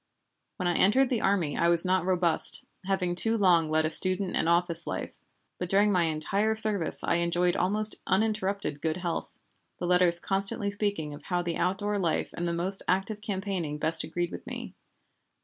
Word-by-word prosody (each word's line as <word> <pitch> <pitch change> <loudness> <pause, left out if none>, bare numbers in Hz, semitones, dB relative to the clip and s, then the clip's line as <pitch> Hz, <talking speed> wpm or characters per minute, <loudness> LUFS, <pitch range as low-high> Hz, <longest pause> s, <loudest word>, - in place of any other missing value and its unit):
When 185 -3 -3
I 175 - +1
entered 260 +7 +3
the 235 -4 0
army 185 -7 0
I 170 - +1
was 170 0 +5
not 185 -1 +1
robust, 175 -3 +1 0.2
having 185 -2 -1
too 225 +6 +1
long 175 -6 +3
led 155 0 +1
a 155 - 0
student 185 +2 +2
and - - 0
office 170 -1 +1
life, - - -6 0.4
but 180 - -4
during 205 +2 +3
my 180 -3 +2
entire 195 +8 -1
service 215 -6 +4
I - - +1
enjoyed 175 +1 0
almost 210 +4 +1
uninterrupted 200 -6 -1
good 160 +1 -2
health, 175 -2 -4 0.5
the - - -5
letters 180 -1 +4
constantly 195 +2 -3
speaking 200 -7 -3
of 145 - -12
how 175 -1 -2
the 170 -1 -3
outdoor 200 +3 -1
life 170 -4 -2
and 175 - -3
the - - -1
most 180 +3 +1
active 195 +3 -1
campaigning 190 -7 -4
best 160 +2 +2
agreed 175 +2 -4
with - - -9
me. - - -7
180 Hz, 185 wpm, -27 LUFS, 170-200 Hz, 0.5 s, was